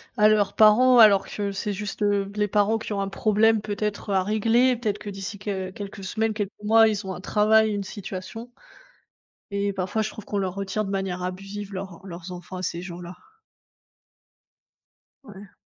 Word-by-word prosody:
à 210 Hz, -2 st, +5 dB
leurs 205 Hz, -2 st, +2 dB
parents 245 Hz, +4 st, +6 dB
alors 200 Hz, -3 st, +7 dB
que 200 Hz, -1 st, -3 dB
c'est 200 Hz, +1 st, -3 dB
juste, 210 Hz, +1 st, -6 dB
heu, 200 Hz, -1 st, +1 dB
les 210 Hz, 0 st, +1 dB
parents 210 Hz, +2 st, +2 dB
qui 220 Hz, -, -5 dB
ont 200 Hz, -, -1 dB
un 195 Hz, -, -2 dB
problème 215 Hz, +2 st, +3 dB
peut-être 210 Hz, 0 st, -3 dB
à 190 Hz, -1 st, +2 dB
régler, 230 Hz, +4 st, +2 dB
peut-être 210 Hz, -3 st, -2 dB
que 210 Hz, -, -7 dB
d'ici 195 Hz, 0 st, -6 dB
qu 190 Hz, -2 st, -4 dB
quelques 200 Hz, -1 st, -8 dB
semaines, 220 Hz, +3 st, -1 dB
quelques 205 Hz, -2 st, -3 dB
mois, 225 Hz, +1 st, +6 dB
ils 205 Hz, -2 st, -2 dB
ont 190 Hz, -, -3 dB
un 180 Hz, -, -8 dB
travail, 215 Hz, +2 st, +3 dB
une 200 Hz, -, -2 dB
situation 195 Hz, +4 st, -7 dB, 1.0 s
et 200 Hz, 0 st, 0 dB
parfois 190 Hz, +3 st, -2 dB
je 215 Hz, -, -3 dB
trouve 215 Hz, -, -10 dB
qu'on 205 Hz, -, -3 dB
leur 185 Hz, -2 st, -2 dB
retire, 200 Hz, +2 st, -2 dB
de 195 Hz, -, -5 dB
manière 190 Hz, -2 st, -2 dB
abusive, 195 Hz, +3 st, -6 dB
leurs 190 Hz, -2 st, -7 dB
leurs 175 Hz, 0 st, -8 dB
enfants 180 Hz, +1 st, -8 dB
à 180 Hz, -, -5 dB
ces 170 Hz, 0 st, -3 dB
gens-là. 175 Hz, 0 st, -8 dB, 2.1 s
Ouais. 200 Hz, -3 st, -13 dB
205 Hz, 185 wpm, -25 LUFS, 190-215 Hz, 2.1 s, alors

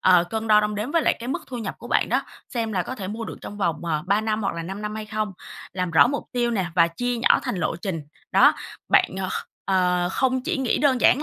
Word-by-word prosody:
ờ, 180 Hz, -2 st, +5 dB
cân 220 Hz, +4 st, -4 dB
đo 210 Hz, 0 st, +7 dB
đong 210 Hz, 0 st, -1 dB
đếm 210 Hz, +6 st, -3 dB
với 330 Hz, +1 st, +2 dB
lại -, -, +2 dB
cái 240 Hz, -, -6 dB
mức 265 Hz, -, -2 dB
thu 250 Hz, -, -6 dB
nhập 225 Hz, -, -4 dB
của -, -, -10 dB
bạn -, -, +2 dB
đó, -, -, +1 dB, 0.3 s
xem 230 Hz, -3 st, -2 dB
là 185 Hz, -3 st, +1 dB
có 255 Hz, -, -5 dB
thể 195 Hz, -6 st, -6 dB
mua 225 Hz, +3 st, -4 dB
được -, -, -7 dB
trong 205 Hz, -, -8 dB
vòng, 170 Hz, -5 st, -1 dB
ờ, 155 Hz, -3 st, -1 dB
3 200 Hz, +2 st, +3 dB
năm, 220 Hz, 0 st, -1 dB
hoặc 195 Hz, -, -1 dB
là 165 Hz, -, -4 dB
5 195 Hz, +4 st, -6 dB
năm 210 Hz, 0 st, -3 dB
hay 215 Hz, 0 st, -5 dB
không? 215 Hz, -1 st, -2 dB, 0.4 s
Làm 180 Hz, -1 st, -2 dB
rõ 165 Hz, -, +6 dB
mục 285 Hz, +3 st, -2 dB
tiêu 240 Hz, -2 st, +1 dB
nè 195 Hz, -6 st, 0 dB
và 170 Hz, -2 st, +5 dB
chia 245 Hz, +8 st, -2 dB
nhỏ 230 Hz, -, +4 dB
thành -, -, -2 dB
lộ 160 Hz, -1 st, -1 dB
trình, 175 Hz, -2 st, -4 dB, 0.3 s
đó. -, -, +7 dB, 0.4 s
Bạn, -, -, +4 dB
ờ, 185 Hz, -, -2 dB, 0.4 s
ờ, 180 Hz, -2 st, +2 dB
không 260 Hz, -1 st, +1 dB
chỉ -, -, -1 dB
nghĩ 265 Hz, -3 st, 0 dB
đơn 265 Hz, -4 st, +3 dB
giản 270 Hz, +4 st, +5 dB
210 Hz, 275 wpm, -24 LUFS, 180-240 Hz, 0.4 s, đo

